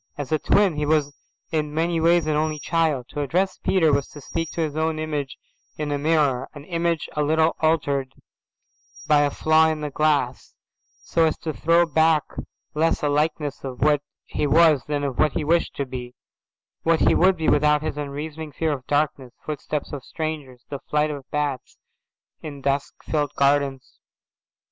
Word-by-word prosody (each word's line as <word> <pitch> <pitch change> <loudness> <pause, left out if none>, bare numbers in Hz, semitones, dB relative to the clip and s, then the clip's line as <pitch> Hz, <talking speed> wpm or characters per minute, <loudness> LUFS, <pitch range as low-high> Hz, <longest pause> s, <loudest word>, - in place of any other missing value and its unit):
As 145 -1 -5
a 155 - +2
twin 195 -3 +3
he 150 - 0
was 145 -2 +1 0.4
in 155 -2 -1
many 165 +1 +1
ways 170 0 +4
an 155 -1 0
only 155 0 0
child. 150 -4 0
To 145 - -4
address 180 +7 0
Peter 165 -6 +2
was 140 -1 +1
to 150 - -12
speak 165 +3 -4
to 170 - -2
his 155 -2 -2
own 160 0 0
image 150 -3 -3 0.4
in 150 -1 -3
a 145 - -1
mirror, 145 -4 +1
an 145 - -9
image 170 -1 -1
a 150 - 0
little 160 +2 +2
altered 140 -4 0 0.9
by 150 -1 +4
a 145 - +3
flaw 155 +2 +3
in 155 -1 -2
the 150 -1 -4
glass, 145 -4 0 0.5
so 165 -1 +2
as 160 - 0
to 155 - -4
throw 170 +3 +3
back 160 -1 +3 0.5
less 160 +1 +1
a 145 - +2
likeness 150 -1 -1
of 130 -2 -7
what 150 -1 +3 0.2
he 150 - -2
was 155 -2 +5
than 145 -1 -2
of 135 -3 -3
what 155 -2 +3
he - - -1
wished 165 +3 +1
to 140 - -2
be, 125 -1 -7 0.7
what 165 -1 +2
he - - +5
would 185 +1 +4
be 160 - -2
without 150 0 +3
his 155 - -3
unreasoning 150 +2 -5
fear 160 +3 0
of 130 -2 -7
darkness, 145 -4 -1
footsteps 150 -1 -4
of 140 -3 -5
strangers, 150 -6 -5
the 140 - -4
flight 150 0 +1
of 140 -2 -8
bats 145 -3 -3 0.6
in 145 -3 -7
dusk 140 0 -2
filled 145 -2 -1
gardens. 140 -1 0
150 Hz, 180 wpm, -23 LUFS, 140-160 Hz, 0.9 s, was